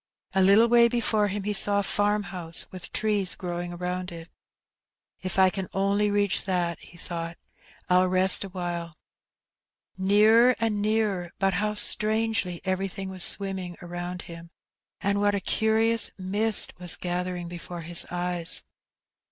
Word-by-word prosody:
A 190 - +2
little 200 +5 +5
way 235 0 +5
before 225 -3 0
him 200 0 -4
he 210 +1 -2
saw 205 0 +4
a - - -1
farmhonsOj 195 -5 -1
with 185 -2 -7
trees 205 -4 -1
growing 175 -1 -5
around 180 +1 -5
it. 165 0 -10 0.9
''If 185 0 -2
I 190 -1 +5
can 190 -1 -5
only 200 +2 +1
reach 205 -1 +1
that/' 175 -3 -1
he 170 - -15
thought^ 170 -1 -6 0.5
"I'll 180 0 +3
rest 185 +1 +2
awhile.'' 175 -3 -5 1.0
Nearer 215 +6 +4
and 220 -2 -1
nearer, 210 -4 -1
but 195 0 +1
how 210 +3 -1
strangely 215 -4 +2
everything 190 +1 -3
was 185 -2 0
swim 195 -1 0
ming 180 -2 -7
around 175 0 -6
him, 170 0 -11 0.5
and 200 +1 0
what 205 0 +2
a - - -1
curious 220 +3 +2
mist 205 +3 +1
was 180 -1 +3
gathering 180 0 -4
before 175 0 -8
his 170 +1 +2
eyes 175 -1 0
190 Hz, 145 wpm, -26 LUFS, 175-205 Hz, 1.0 s, little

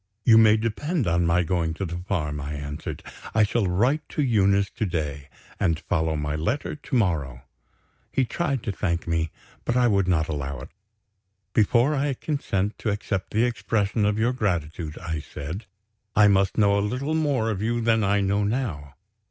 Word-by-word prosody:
"You 110 -1 +8
may 110 -1 +6
depend 125 - -1
on 85 0 +2
my 85 +1 +3
going 85 -1 -1
to 100 - -3
the 85 0 -4
farm," 75 -6 -2
I 70 +2 -4
answered. 75 0 -6 0.3
"I 110 - +5
shall 105 -1 +1
write 120 - +2
to 150 - -1
Eunice 100 -5 +3
to 110 -3 -2
day, 75 -4 -3 0.3
and 80 -2 +2
follow 80 0 0
my 75 0 -2
letter 105 - -2
to 150 -2 -5
morrow." 75 - 0 0.7
He 130 - +2
tried 140 -2 -2
to 105 - -2
thank 85 -3 -2
me; 80 -1 0 0.3
but 120 - 0
I 125 -1 +4
would 100 -4 +2
not 80 -4 +2
allow 70 -3 -4
it. 65 - -9 0.8
"Before 115 +6 +3
I 140 -1 0
consent 105 -9 -2
to 110 - -1
accept 100 -2 -2
the 110 +3 +3
expression 110 -3 0
of 105 0 +2
your 115 +3 +2
gratitude," 85 -8 -2
I 80 -2 -4
said, 75 +7 -7 0.5
"I 105 0 +7
must 95 -2 +3
know 100 -2 +4
a - - +1
little 125 +9 -2
more 140 -8 +1
of 100 -2 -3
you 120 +2 0
than 115 -1 +2
I 100 +1 +2
know 100 +1 +1
now. 100 - -2
100 Hz, 185 wpm, -25 LUFS, 80-115 Hz, 0.8 s, You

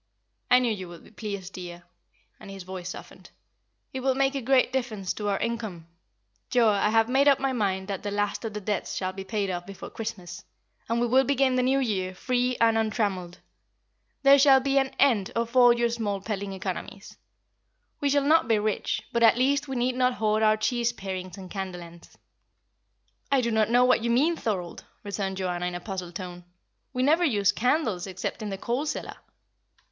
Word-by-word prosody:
"I 250 - +7
knew 245 -3 +1
you 190 -3 -7
would 170 -1 -12
be - - -17
pleased, 200 -4 -6
dear;" 175 -1 -8 0.6
and - - -11
his 195 -1 -8
voice 185 -1 -7
softened. - - -10 0.6
"It 265 - -3
will 260 0 +1
make 270 0 +2
a 275 - -3
great 255 +1 +3
difference 220 -8 -2
to 210 -1 -3
our 200 - +1
income. 220 -8 -4 0.6
Joa, 235 -4 +4
I 210 - +2
have 225 0 +3
made 270 +3 +3
up 275 -1 +5
my 270 -1 0
mind 190 -5 -1
that 195 -2 -4
the 205 - -4
last 205 +2 -2
of 220 -2 -5
the 210 - -4
debts 205 -1 -3
shall 185 -1 -2
be 195 0 -6
paid 200 -1 -2
off 175 0 -5
before 195 -1 -9
Christmas, 180 -6 -6 0.5
and 230 +1 +1
we 240 - +2
will 255 +3 +4
begin 270 0 +2
the 255 - +2
New 260 +2 +2
Year 190 -8 -1
free 250 +3 0
and 225 -1 +4
untrammelled. 205 -5 -2 0.8
There 275 +1 +7
shall 270 -1 +7
be 275 +1 +2
an 270 0 0
end 230 -9 +3
of 235 +1 -2
all 245 -1 +7
your 235 0 +2
small 215 -4 -2
peddling 200 -1 -4
economies. 190 0 -6 0.8
We 285 - +1
shall 285 0 +2
not 320 -1 +4
be 225 -2 +3
rich, 210 0 -1
but 235 - +1
at 230 0 +6
least 275 +3 +1
we 265 - -4
need 250 +1 +1
not 250 0 +1
hoard 215 0 +1
our 215 0 +4
cheese 240 +2 0
parings 185 -4 -6
and 185 -2 -10
candle 190 -3 -5
ends." 170 0 -15 1.1
"I 275 - +4
do 235 -1 -1
not 220 -1 +2
know 245 +1 +5
what 250 -2 +3
you 235 - 0
mean, 290 +9 +3
Thorold!" 185 - -4 0.2
returned 200 -2 -3
Joanna, 180 -2 -2
in 180 - -4
a - - -3
puzzled 180 -2 -6
tone. 180 -1 -7 0.5
"We 255 -1 -1
never 315 +6 +3
use 205 - +3
candles 230 - 0
except 185 +2 -5
in 215 - -4
the 195 - -4
coal 245 +9 -2
cellar." - - -4
220 Hz, 205 wpm, -26 LUFS, 190-250 Hz, 1.1 s, I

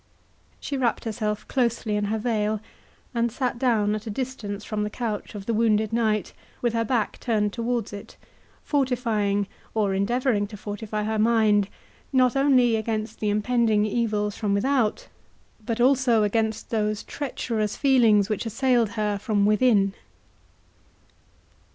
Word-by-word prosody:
She 280 - -4
wrapped 245 -3 0
herself 210 -1 -3
closely 235 -4 0
in 210 0 0
her 215 +2 -1
veil, 215 -2 0 0.5
and 235 -1 0
sat 245 0 -2
down 220 -5 +2
at 215 +2 -5
a - - -2
distance 215 -4 -4
from 215 -1 -3
the 210 - -1
couch 220 -2 -4
of 200 -1 -7
the 230 - -1
wounded 220 -1 +2
knight, 220 -3 0 0.3
with 240 -2 0
her 230 0 +1
back 230 -1 -1
turned 210 -4 0
towards 235 -2 -2
it, 200 - -9 0.5
fortifying, 230 -8 0 0.3
or 205 -3 +1
endeavouring 210 +2 +1
to 210 0 -10
fortify 210 +1 -4
her 220 0 -1
mind, 215 -3 +3 0.4
not 255 -2 +3
only 260 -4 +4
against 220 0 -3
the 210 - 0
impending 215 0 +2
evils 210 -2 -1
from 205 -2 0
without, 240 0 +1 0.6
but 230 +1 -3
also 250 -3 +4
against 220 +1 -1
those 215 -2 0
treacherous 230 -7 -3
feelings 230 -7 +4
which 215 +1 -2
assailed 240 0 +2
her 210 -1 0
from 205 -2 +1
within. 210 -2 +3
220 Hz, 145 wpm, -25 LUFS, 210-240 Hz, 0.6 s, only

